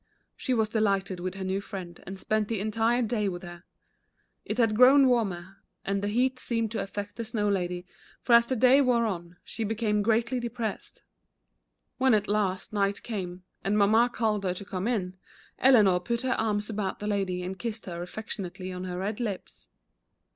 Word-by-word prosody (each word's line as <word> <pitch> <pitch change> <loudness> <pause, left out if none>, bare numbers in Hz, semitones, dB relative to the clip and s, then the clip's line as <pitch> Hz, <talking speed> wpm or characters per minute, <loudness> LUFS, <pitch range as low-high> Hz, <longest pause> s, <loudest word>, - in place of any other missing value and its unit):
She 255 - -1
was 220 -2 +2
delighted 200 -4 0
with 185 +1 -4
her 195 - -5
new 190 +1 -1
friend 185 -4 -8
and 190 +1 -6
spent 215 +2 0
the 225 -2 -2
entire 225 +4 +1
day 215 -3 0
with 175 -1 -6
her. 175 +1 -10 0.8
It 215 - -3
had 225 -3 +3
grown 265 +3 +7
warmer, 195 -6 0 0.3
and 195 0 0
the 205 - -1
heat 255 +4 +1
seemed 230 -3 -1
to 225 - -2
affect 205 +1 -6
the 230 - -3
Snow 215 -2 -1
Lady, 180 -2 -1 0.3
for 240 - +1
as 235 0 +7
the 260 - 0
day 255 +4 +6
wore 245 -3 +3
on, 175 -4 -4
she 225 - -4
became 215 -1 0
greatly 230 +4 +1
depressed. 235 -3 -5 1.0
When 260 -3 +5
at 210 -1 0
last 200 -2 -1
night 200 -1 0
came, 185 -5 -5 0.2
and 205 +2 +1
Mamma 220 +4 +4
called 215 -4 0
her 180 -1 -1
to 200 - -7
come 190 +1 -3
in, 190 -6 -2 0.4
Eleanor 215 -9 +6
put 235 +7 -2
her 255 -1 +1
arms 210 -1 -1
about 210 -3 -3
the 210 - -7
Lady 195 -3 -1
and 185 +1 -5
kissed 230 -1 -4
her 175 -2 -5
affectionately 185 -1 -6
on 180 0 -5
her 180 -1 -4
red 205 +4 -3
lips. 190 - -5
210 Hz, 190 wpm, -28 LUFS, 190-230 Hz, 1.0 s, grown